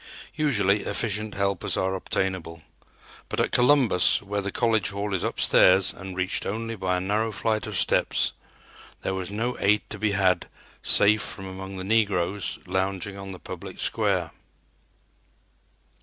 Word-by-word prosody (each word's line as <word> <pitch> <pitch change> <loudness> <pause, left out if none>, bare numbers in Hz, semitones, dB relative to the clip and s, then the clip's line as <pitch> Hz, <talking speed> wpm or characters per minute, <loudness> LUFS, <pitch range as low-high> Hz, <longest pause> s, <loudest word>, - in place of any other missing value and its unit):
Usually 105 -10 +2
efficient 110 -1 -1
helpers 100 -2 -1
are 95 0 0
obtainable, 95 -4 -3 0.7
but - - -3
at - - +1
Columbus, 125 -7 +4
where 100 +1 -2
the 100 0 -4
college 110 -4 +1
hall 100 0 -3
is 95 - 0
upstairs 95 +1 +4
and 95 -1 -9
reached 95 +1 -1
only 115 +3 -3
by 95 -3 -1
a - - -1
narrow 105 +4 0
flight 110 +1 -1
of 105 -3 -3
steps, - - +1 0.7
there 95 - -1
was 95 -1 -4
no 115 +5 -2
aid 105 +1 +3
to 105 - -5
be 105 -1 +1
had 95 -2 +2 0.3
save 105 +1 +4
from 95 - -2
among 95 +1 -7
the 95 - -5
negroes 100 -2 0
lounging 95 +1 -2
on 95 -1 -8
the 90 - -8
public - - -9
square. - - 0
100 Hz, 150 wpm, -25 LUFS, 95-110 Hz, 0.7 s, Columbus